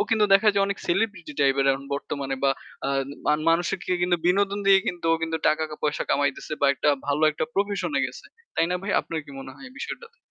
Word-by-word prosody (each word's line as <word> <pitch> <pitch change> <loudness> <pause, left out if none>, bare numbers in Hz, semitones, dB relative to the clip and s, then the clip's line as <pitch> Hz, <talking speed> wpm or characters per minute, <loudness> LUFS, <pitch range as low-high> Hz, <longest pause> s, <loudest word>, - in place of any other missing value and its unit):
কিন্তু 220 -2 +4
দেখা 210 +2 +5
যায় 200 0 +2
অনেক 200 0 -3
celebrity 185 -3 -1
type 135 -1 +3
এর 135 - +2
এখন 135 +1 -5
বর্তমানে 140 -1 -3
বা 135 - +5 0.4
আ - - 0 0.4
মা - - +4 0.2
মানুষকে 175 +2 0
কিন্তু 175 0 +3
বিনোদন 200 +2 +2
দিয়ে 195 - +6 0.2
কিন্তু 175 -4 -3
ও - - +5
কিন্তু 165 0 -1
টাকা-পয়সা 155 -1 -1
কামাইতেছে 145 +1 0
বা 145 - +4
একটা 140 - 0 0.2
ভালো 145 +2 0
একটা 155 - -2
profession 200 -1 -1
এ - - +2
গেছে। - - -11 0.3
তাই - - +2
না 180 - +1
ভাই? 200 - -3
আপনার 160 -1 -4
কি 145 - -13
মনে 135 0 -8
হয় 265 - -12
এই - - -18
বিষয়টাতে? 470 0 -7
165 Hz, 215 wpm, -25 LUFS, 145-200 Hz, 0.4 s, দিয়ে